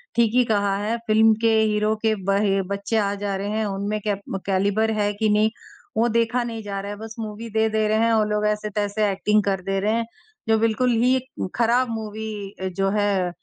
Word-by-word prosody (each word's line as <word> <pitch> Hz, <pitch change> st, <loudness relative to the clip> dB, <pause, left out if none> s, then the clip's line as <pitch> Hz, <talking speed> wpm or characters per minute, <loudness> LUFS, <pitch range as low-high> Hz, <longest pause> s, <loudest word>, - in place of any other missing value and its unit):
ठीक 235 Hz, -2 st, +3 dB
ही 250 Hz, -, +5 dB
कहा 205 Hz, -3 st, +1 dB
है 230 Hz, +2 st, -1 dB
फ़िल्म 220 Hz, +1 st, +5 dB
के 225 Hz, -1 st, +3 dB
हीरो 215 Hz, 0 st, +1 dB
के 220 Hz, -1 st, +2 dB
बहे 195 Hz, 0 st, +2 dB
बच्चे 200 Hz, +3 st, -2 dB
आ 200 Hz, -1 st, +1 dB
जा 200 Hz, -1 st, -1 dB
रहे 200 Hz, +1 st, -3 dB
हैं 215 Hz, +1 st, -1 dB
उनमें 205 Hz, +1 st, -2 dB
केब 200 Hz, -1 st, -3 dB
कैलिबर 200 Hz, +3 st, +1 dB
है 205 Hz, 0 st, +1 dB
कि 215 Hz, +1 st, 0 dB
नहीं 210 Hz, +1 st, +3 dB, 0.5 s
वो 235 Hz, +2 st, +3 dB
देखा 235 Hz, +2 st, +1 dB
नहीं 225 Hz, -2 st, -5 dB
जा 200 Hz, -1 st, -4 dB
रहा 200 Hz, -, -6 dB
है 205 Hz, -, -6 dB
बस 220 Hz, 0 st, -8 dB
मूवी 220 Hz, +1 st, -6 dB
दे, 220 Hz, +1 st, +2 dB
दे 215 Hz, 0 st, +1 dB
रहे 215 Hz, +1 st, +2 dB
हैं 230 Hz, 0 st, +3 dB
और 215 Hz, -1 st, +3 dB
लोग 210 Hz, 0 st, 0 dB
ऐसे-तैसे 210 Hz, 0 st, -1 dB
एक्टिंग 210 Hz, +2 st, +2 dB
कर 195 Hz, -2 st, -1 dB
दे 195 Hz, +1 st, -1 dB
रहे 210 Hz, +3 st, +1 dB
हैं। 230 Hz, 0 st, 0 dB, 0.4 s
जो 220 Hz, -, +5 dB
बिल्कुल 230 Hz, +3 st, +2 dB
ही 255 Hz, +2 st, +3 dB, 0.4 s
ख़राब 240 Hz, +2 st, +2 dB
मूवी 220 Hz, 0 st, -5 dB, 0.3 s
अ 190 Hz, -, -1 dB
जो 195 Hz, 0 st, +2 dB
है 200 Hz, -3 st, +1 dB
215 Hz, 215 wpm, -23 LUFS, 200-225 Hz, 0.5 s, ही